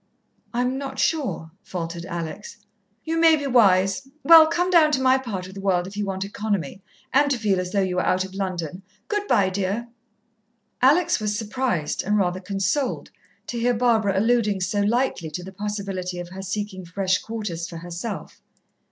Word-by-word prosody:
"I'm 250 +2 -1
not 270 -1 -6
sure," 265 - -1
faltered 170 -1 -5
Alex. 170 +3 -6 0.5
"You 325 +1 -1
may 325 -1 +6
be 290 -2 -4
wise. 200 -2 +3 0.2
Well, 325 -1 +9
come 355 +3 0
down 320 -4 +6
to 270 - +2
my 260 0 +4
part 205 -8 -5
of 190 - -10
the 195 - -8
world 180 -3 +1
if 195 +2 -9
you 210 0 -2
want 190 0 -3
economy 200 -4 -3 0.3
and 285 +1 +4
to 270 - +1
feel 205 -4 +1
as 180 0 -3
though 200 0 +2
you 180 -1 -2
were - - +3
out 185 +1 +1
of 190 - -11
London. 185 -3 -4 0.3
Good 415 -1 -1
bye, 195 - +3
dear." 200 +5 -2 0.9
Alex 335 +6 +4
was 210 -1 -1
surprised, 220 - -1
and 210 +2 +1
rather 185 -2 +1
consoled, 200 +8 -2 0.3
to 240 - -4
hear 245 +1 +2
Barbara 220 -5 +2
alluding 215 -2 +2
so 195 +3 0
lightly 220 -6 0
to 175 +4 -6
the 190 +1 -9
possibility 195 -3 -4
of 175 0 -6
her 190 +1 -8
seeking 195 0 -4
fresh 185 +2 0
quarters 210 -7 -5
for 170 - -7
herself. 175 +5 -6
200 Hz, 180 wpm, -24 LUFS, 185-245 Hz, 0.9 s, Well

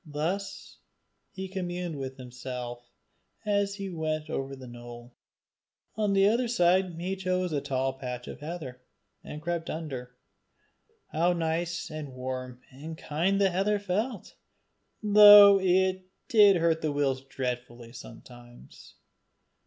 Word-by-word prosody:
Thus 180 +7 -4 0.5
he 190 0 -6
communed 180 -3 -4
with 135 0 -6
himself 125 -1 -7 0.6
as 200 -1 0
he 195 -2 -6
went 155 -1 -3
over 135 -1 -4
the 130 -1 -11
knoll. 120 0 -11 0.8
On 210 -2 0
the 195 0 +4
other 235 +4 +2
side 180 -5 +2
he 185 +3 -2
chose 185 -2 -1
a 145 - 0
tall 135 -1 -1
patch 125 -2 -7
of - - -8
heather, 150 -5 -7 0.4
and 150 +1 -9
crept 170 0 -3
under. 130 -6 -6 1.0
How 170 +3 +2
nice 170 0 -2
and 150 -4 -7
warm 130 -1 -6
and 155 +5 -9
kind 175 +8 0
the 195 -2 +3
heather 195 +4 +1
felt, 205 +2 -3 0.7
though 205 -1 +9
it 185 0 +1 0.2
did 210 -6 +6
hurt 165 -1 +1
the 155 - -1
weals 140 -2 0
dreadfully 125 -3 -6
sometimes. 120 - -14
160 Hz, 130 wpm, -28 LUFS, 130-190 Hz, 1.0 s, though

